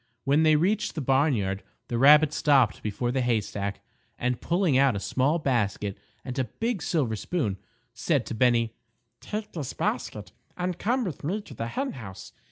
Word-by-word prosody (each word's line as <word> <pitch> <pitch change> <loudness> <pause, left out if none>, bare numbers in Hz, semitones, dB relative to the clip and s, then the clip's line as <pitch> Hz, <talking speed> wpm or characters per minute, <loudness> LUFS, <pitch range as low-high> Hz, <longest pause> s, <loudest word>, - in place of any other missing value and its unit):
When 140 +3 +3
they 155 -1 +5
reached 195 +8 +1
the - - -2
barnyard 130 -8 +1 0.3
the 120 - -2
rabbit 150 +3 +7
stopped 135 -7 +3
before 115 +3 -2
the 130 +1 0
haystack, 105 -4 -1 0.4
and 125 0 -1
pulling 170 -4 +1
out 135 -2 +4
a - - -1
small 135 +10 +1
basket 105 - -1 0.3
and 130 0 -4
a 130 - +1
big 225 - -3
silver 140 -9 0
spoon, 110 - -2 0.4
said - - 0
to - - -5
Bennie: 115 -1 +2 0.5
"Take 210 0 -5
this 150 -7 -5
basket - - -3 0.3
and 180 -1 -2
come 245 +4 +1
with 175 - -5
me 185 +9 -1
to 175 - -12
the 115 -1 -4
hen 270 - -2
house. 110 -8 -10
135 Hz, 175 wpm, -27 LUFS, 115-165 Hz, 0.5 s, rabbit